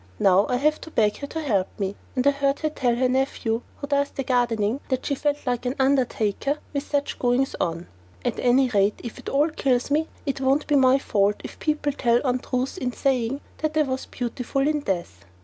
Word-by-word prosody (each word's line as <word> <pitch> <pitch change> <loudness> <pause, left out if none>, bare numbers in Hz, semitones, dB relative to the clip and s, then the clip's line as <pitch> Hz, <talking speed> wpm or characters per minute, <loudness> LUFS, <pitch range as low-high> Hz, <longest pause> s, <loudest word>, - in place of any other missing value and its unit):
Now 195 +1 +4
I 250 - +2
have 300 +4 +1
to - - -9
beg 210 -8 +2
her 280 - -6
to 320 +2 -4
help 205 -11 +1
me, 195 0 -2 0.2
and 255 0 0
I 280 - +6
heard 280 0 0
her 310 -1 0
tell 250 -5 +1
her 255 +1 +2
nephew, 250 -3 0 0.2
who - - -5
does 280 0 +1
the 270 - -4
gardening, 240 -2 +1
that 260 -2 -1
she 285 - 0
felt 290 +1 -1
like 245 -2 -1
an 250 - -1
undertaker 265 -1 +1 0.2
with 280 - 0
such 285 -1 -1
goings 250 +2 +1
on. 170 0 -2 0.4
At - - -1
any 255 +2 +4
rate, 205 -2 +2
if 235 - -7
it - - -6
all 290 +4 +3
kills 265 -3 0
me 310 +2 +2 0.2
it 275 -2 -2
won't 270 +3 +2
be 295 - +1
my 265 -1 +5
fault 205 -6 +1
if - - -9
people 300 -1 0
tell 240 -3 +2
untruths 255 +3 -1
in 250 -5 -1
saying 265 0 0 0.2
that 310 0 -1
I 305 - +5
was 260 -2 -3
"beautiful 250 +3 -2
in 305 0 +1
death." 170 - -3
260 Hz, 215 wpm, -24 LUFS, 235-280 Hz, 0.4 s, I